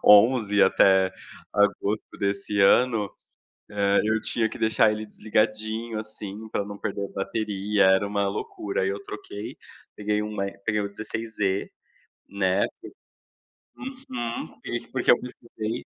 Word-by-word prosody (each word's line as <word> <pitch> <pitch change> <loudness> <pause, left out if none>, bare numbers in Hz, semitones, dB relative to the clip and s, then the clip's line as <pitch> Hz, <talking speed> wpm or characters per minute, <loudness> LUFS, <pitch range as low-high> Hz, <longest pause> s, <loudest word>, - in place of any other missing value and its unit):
11 105 -1 +6
até 95 0 +5 0.4
agosto 105 +1 +1
desse 100 +1 -1
ano, 110 0 +4 0.6
eh, 100 -1 +3
eu 110 +1 +2
tinha 115 -2 +1
que - - -9
deixar 110 0 +4
ele 110 0 -4
desligadinho, 110 +1 -1
assim, 110 0 -8
pra 100 - -1
não 100 0 -8
perder 100 - -3
a - - -8
bateria, 105 0 0
era 95 +1 +5
uma 100 0 0
loucura, 100 0 -3
aí 95 - +1
eu 100 +1 -3
troquei, 105 0 -7 0.4
peguei 105 0 0
o 105 -1 -3
E 100 0 -4
peguei 105 -1 +1
o 100 - -2
16E, 105 -1 -2 0.6
né, 95 -1 +2
que - - -13 1.2
Uhum. 120 -2 -3 0.4
Porque 130 -2 +3
eu 120 - +5
pesquisei 115 -2 -5
105 Hz, 135 wpm, -26 LUFS, 100-110 Hz, 1.2 s, 11